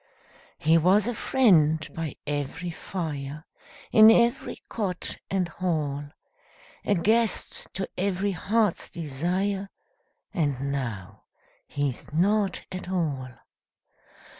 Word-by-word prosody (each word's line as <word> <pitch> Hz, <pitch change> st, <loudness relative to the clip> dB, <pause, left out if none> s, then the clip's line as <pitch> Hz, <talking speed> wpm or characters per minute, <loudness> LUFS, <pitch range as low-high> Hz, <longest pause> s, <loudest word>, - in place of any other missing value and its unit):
He 160 Hz, +2 st, +4 dB
was 190 Hz, +5 st, +4 dB
a 245 Hz, -, -1 dB
friend 160 Hz, -, +3 dB
by 165 Hz, -4 st, -4 dB
every 145 Hz, +4 st, -3 dB
fire, 150 Hz, -4 st, -5 dB, 0.5 s
In 220 Hz, 0 st, +9 dB
every 235 Hz, +3 st, +2 dB
cot 190 Hz, -5 st, -2 dB
and 190 Hz, -2 st, 0 dB
hall 155 Hz, -5 st, -2 dB, 0.8 s
A 205 Hz, -, +2 dB
guest 220 Hz, +4 st, +1 dB
to 190 Hz, 0 st, -2 dB
every 195 Hz, +1 st, 0 dB
heart's 205 Hz, +2 st, 0 dB
desire, 180 Hz, +6 st, -2 dB, 0.6 s
And 140 Hz, -6 st, -1 dB
now 115 Hz, -9 st, -5 dB, 0.4 s
he's 145 Hz, -3 st, -3 dB
nought 195 Hz, +4 st, +1 dB
at 185 Hz, -1 st, -6 dB
all. 150 Hz, -8 st, -1 dB
175 Hz, 100 wpm, -26 LUFS, 145-200 Hz, 0.8 s, In